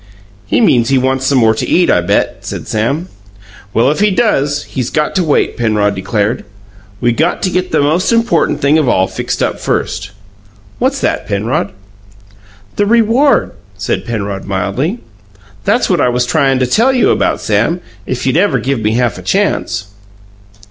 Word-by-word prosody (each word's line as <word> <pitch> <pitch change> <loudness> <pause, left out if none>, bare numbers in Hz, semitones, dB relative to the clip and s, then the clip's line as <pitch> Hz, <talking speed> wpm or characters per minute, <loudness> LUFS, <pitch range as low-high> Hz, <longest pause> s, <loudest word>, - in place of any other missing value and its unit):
"He - - +1
means 120 - +3
he 135 - +3
wants 130 +1 0
some 140 - +2
more 110 -3 +4
to 110 - -3
eat, 175 0 +3
I - - +3
bet," 100 +4 0
said - - -7
Sam. 135 +11 -1 0.6
"Well, 120 +6 +2
if 150 - -2
he 210 +1 +4
does, 145 - +1
he's 125 -3 -4
got 150 -1 -1
to 185 - +1
wait," 150 -3 +1
Penrod 105 -3 +1
declared. 100 +4 -1 0.6
"We 120 +2 +2
got 160 +9 0
to 185 - +1
get 185 0 -1
the 155 - +2
most 155 +9 +1
important 230 -7 +1
thing 145 +3 +3
of 145 -5 +1
all 95 -5 +3
fixed - - -3
up - - -2
first." 100 - -2 0.7
"What's 265 +2 0
that, - - -1
Penrod?" 105 +4 -1 1.1
"The 205 - +2
reward," 235 +5 +3 0.3
said - - -2
Penrod 100 -4 -4
mildly. 100 - -2 0.7
"That's - - +2
what - - +1
I - - +3
was 125 0 0
tryin' 135 -1 +2
to 130 - +1
tell 230 - +3
you 255 -2 +3
about, - - +1
Sam, 110 - 0 0.3
if 130 - -3
you'd 130 +3 +1
ever 200 +3 +2
give 135 -1 -1
me 110 0 0
half 120 -2 0
a - - -8
chance." 100 - -1
130 Hz, 175 wpm, -14 LUFS, 110-175 Hz, 1.1 s, more